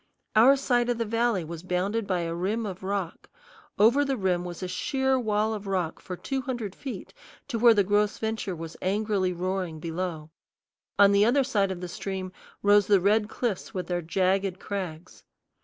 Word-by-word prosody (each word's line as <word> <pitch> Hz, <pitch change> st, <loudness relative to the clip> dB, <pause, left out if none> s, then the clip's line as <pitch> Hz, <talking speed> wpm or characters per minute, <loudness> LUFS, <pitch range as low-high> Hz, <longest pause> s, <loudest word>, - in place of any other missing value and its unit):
Our 245 Hz, +6 st, +7 dB
side 245 Hz, -3 st, +1 dB
of 240 Hz, -, +1 dB
the 230 Hz, -, -1 dB
valley 230 Hz, -3 st, +1 dB
was 160 Hz, 0 st, -7 dB
bounded 190 Hz, +4 st, -1 dB
by 180 Hz, -2 st, 0 dB
a 165 Hz, 0 st, -3 dB
rim 200 Hz, +7 st, -1 dB
of 190 Hz, -3 st, -6 dB
rock. 190 Hz, -3 st, -4 dB, 0.5 s
Over 240 Hz, +7 st, +5 dB
the 275 Hz, -2 st, -1 dB
rim 185 Hz, -3 st, 0 dB
was 175 Hz, +1 st, -7 dB
a -, -, -2 dB
sheer 265 Hz, +7 st, 0 dB
wall 215 Hz, -1 st, 0 dB
of 205 Hz, -2 st, -6 dB
rock 185 Hz, -4 st, -1 dB
for 180 Hz, -, -6 dB
two 270 Hz, +6 st, -3 dB
hundred 240 Hz, -7 st, -4 dB
feet, 265 Hz, +3 st, -7 dB, 0.4 s
to 235 Hz, -4 st, -2 dB
where 235 Hz, 0 st, +7 dB
the 205 Hz, -, +4 dB
Gros 205 Hz, +2 st, +1 dB
Ventre 220 Hz, -4 st, -3 dB
was 165 Hz, 0 st, -8 dB
angrily 200 Hz, -1 st, 0 dB
roaring 180 Hz, -2 st, -3 dB
below; 165 Hz, -1 st, -4 dB, 0.7 s
on 200 Hz, 0 st, +7 dB
the 200 Hz, 0 st, +5 dB
other 260 Hz, +5 st, +4 dB
side 210 Hz, -7 st, +1 dB
of 185 Hz, -2 st, -5 dB
the 180 Hz, -, -4 dB
stream 185 Hz, +1 st, -5 dB, 0.3 s
rose 205 Hz, -1 st, +5 dB
the 200 Hz, -2 st, +5 dB
red 210 Hz, +3 st, +2 dB
cliffs 220 Hz, -6 st, -3 dB
with 185 Hz, -, -2 dB
their 175 Hz, -1 st, -2 dB
jagged 190 Hz, +2 st, 0 dB
crags. 180 Hz, -5 st, -6 dB
200 Hz, 190 wpm, -27 LUFS, 180-225 Hz, 0.7 s, Our